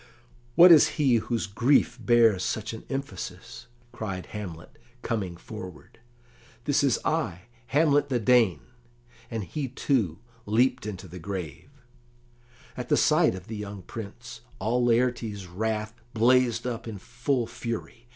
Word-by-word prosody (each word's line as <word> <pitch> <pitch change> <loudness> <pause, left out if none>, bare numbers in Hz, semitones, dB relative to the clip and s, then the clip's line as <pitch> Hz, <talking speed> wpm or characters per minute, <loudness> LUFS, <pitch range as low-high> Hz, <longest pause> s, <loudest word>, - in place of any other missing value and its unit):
"What 175 +1 +9
is 160 -3 +8
he 135 -6 +4
whose 115 +1 -2
grief 125 +4 +2
bears 115 -5 +4
such 110 +1 -2
an 110 - -9
emphasis?" 135 -9 -6 0.2
cried 95 -6 -5
Hamlet, 90 -6 -8 0.2
coming 95 -7 -2
forward. 95 -1 -10 0.6
"This 145 +1 +2
is 135 -4 +3
I, 95 - -1 0.2
Hamlet 145 +2 +3
the 130 - +1
Dane." 110 - +3 0.7
And 115 -3 -3
he, 145 - -4
too, 120 - 0 0.3
leaped 125 +3 +2
into 95 -3 -6
the 90 +2 -9
grave. 90 - -6 1.1
At - - -6
the - - +4
sight - - +4
of 90 -1 -9
the 110 - -6
young 100 -2 -7
Prince, 115 +4 -9 0.2
all 120 +4 0
Laertes's 115 -4 +1
wrath 110 +4 -3 0.2
blazed 120 0 +3
up 120 -2 -4
in 110 -3 -5
full 125 +4 -1
fury. 115 0 -6
115 Hz, 135 wpm, -27 LUFS, 100-125 Hz, 1.1 s, What